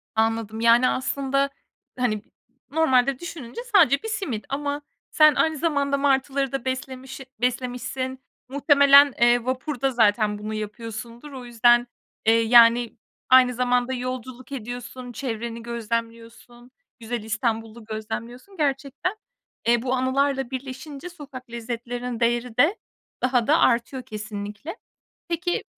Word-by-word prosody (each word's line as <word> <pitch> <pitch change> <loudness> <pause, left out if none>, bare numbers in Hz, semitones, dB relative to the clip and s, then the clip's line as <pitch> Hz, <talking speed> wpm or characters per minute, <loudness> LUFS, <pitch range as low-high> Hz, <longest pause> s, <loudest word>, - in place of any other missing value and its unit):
Anladım. 225 0 0
Yani, 235 +2 +5
aslında, 275 +1 0 0.5
hani, 215 -4 0
b - - -34 0.4
normalde 270 -4 +3
düşününce 335 - -7
sadece 310 -8 +5
1 - - -4
simit 340 - -3
ama 285 +1 -2 0.3
sen 305 -1 +6
aynı 320 -1 +1
zamanda 280 -3 +1
martıları 275 -1 +1
da 270 -2 -4
beslemişi 260 0 -5 0.2
beslemişsin 255 +1 -2 0.3
muhtemelen, 280 0 +6
eee, 240 0 +4
vapurda 260 +1 -1
zaten 215 -3 +2
bunu 215 +1 -5
yapıyorsundur 230 +5 -7
o 260 -2 -8
yüzden, 240 +1 +4 0.4
eee, 225 +1 +5
yani, 235 0 +5 0.3
aynı 255 -1 +6
zamanda 250 +1 +1
yolculuk 255 0 -6
ediyorsun, 245 0 -7
çevreni 235 -2 -5
gözlemliyorsun. 230 +1 -6 0.3
Güzel 230 0 -4
İstanbul'u 225 +1 -3
gözlemliyorsun. 230 - -7
Gerçekten, 280 +5 -1 0.5
eee, 235 -1 +4
bu 255 0 -1
anılarla 270 0 0
birleşince 270 +4 -7
sokak 270 -7 -11
lezzetlerinin 235 +1 -5
değeri 240 0 0
de 310 +11 +4 0.5
daha 250 -2 +2
da 315 +3 +4
artıyor 250 +1 +2
kesinlikle. 215 - -7 0.5
Peki, 345 +1 -1
250 Hz, 120 wpm, -24 LUFS, 235-275 Hz, 0.5 s, sen